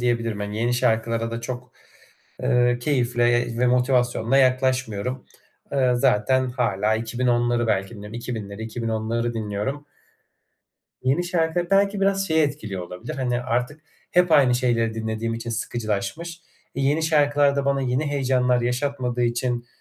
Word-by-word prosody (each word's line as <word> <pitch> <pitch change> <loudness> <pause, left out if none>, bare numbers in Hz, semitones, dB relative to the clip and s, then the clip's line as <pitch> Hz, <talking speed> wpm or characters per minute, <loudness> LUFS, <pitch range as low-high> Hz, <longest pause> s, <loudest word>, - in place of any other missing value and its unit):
diyebilirim. 115 -3 0
Hani 105 +1 -4
yeni 120 +1 +1
şarkılara 115 0 0
da 115 0 -4
çok, 125 +1 -6 0.7
ııı, 120 0 +3
keyifle 120 -3 +1
ve 125 - +3
motivasyonla 125 0 +2
yaklaşmıyorum. 130 -2 +1 0.5
Iıı, 130 -3 +2
zaten 130 +4 +2
hâlâ 110 -4 0
2010'ları 120 +1 0
belki 95 -3 0
dinliyorum. 105 +1 -9
2000'leri, 110 -3 -5
2010'ları 115 +1 -2
dinliyorum. 110 +7 -3 1.2
Yeni 135 +7 +1
şarkı, 175 0 0
belki 200 0 +3
biraz 195 0 +1
şeyi 160 0 +3
etkiliyor 110 -11 -3
olabilir, 90 - -7
hani, 125 -3 -1
artık 125 +4 -2 0.3
hep 180 -1 +3
aynı 135 -5 +5
şeyleri 115 -2 +1
dinlediğim 110 +1 -3
için 115 +1 -5
sıkıcılaşmış. 115 - -3 0.3
E, 135 - -3
yeni 145 +4 +2
şarkılar 145 -2 +3
da 140 - 0
bana 140 0 +1
yeni 130 +3 0
heyecanlar 130 -3 +1
yaşatmadığı 125 0 -1
için 120 0 -1
125 Hz, 135 wpm, -23 LUFS, 115-135 Hz, 1.2 s, aynı